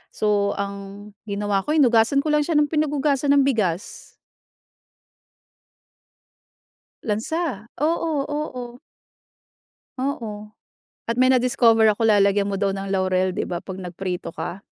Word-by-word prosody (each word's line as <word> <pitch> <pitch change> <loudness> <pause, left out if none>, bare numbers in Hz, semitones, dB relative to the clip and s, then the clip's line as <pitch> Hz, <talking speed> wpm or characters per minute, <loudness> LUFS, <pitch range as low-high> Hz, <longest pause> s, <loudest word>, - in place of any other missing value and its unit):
So, 205 -1 +1
ang 200 +1 -6 0.2
ginawa 200 -1 0
ko, 300 +10 -1
hinugasan 255 0 +4
ko 305 - 0
lang 300 - +4
siya 320 +1 -1
ng 295 0 +2
pinaghugasan 290 -2 0
ng 280 - +5
bigas. 210 -6 -2 2.9
Lansa? 230 - -2
Oo, 320 -1 0
oo. 255 -5 -5 1.2
Oo. 220 -6 -4 0.6
At 230 - -1
may 255 +1 +4
na-discover 235 -3 +4
ako, 215 +2 +1
lalagyan 200 -2 +4
mo 195 0 -3
daw 200 - +2
ng 195 0 -4
laurel, 185 -1 +1
'di - - -3
ba, 175 -1 -4
'pag 190 -1 -7
nagprito 180 0 -5
ka? 185 +3 -6
220 Hz, 120 wpm, -22 LUFS, 200-275 Hz, 2.9 s, ng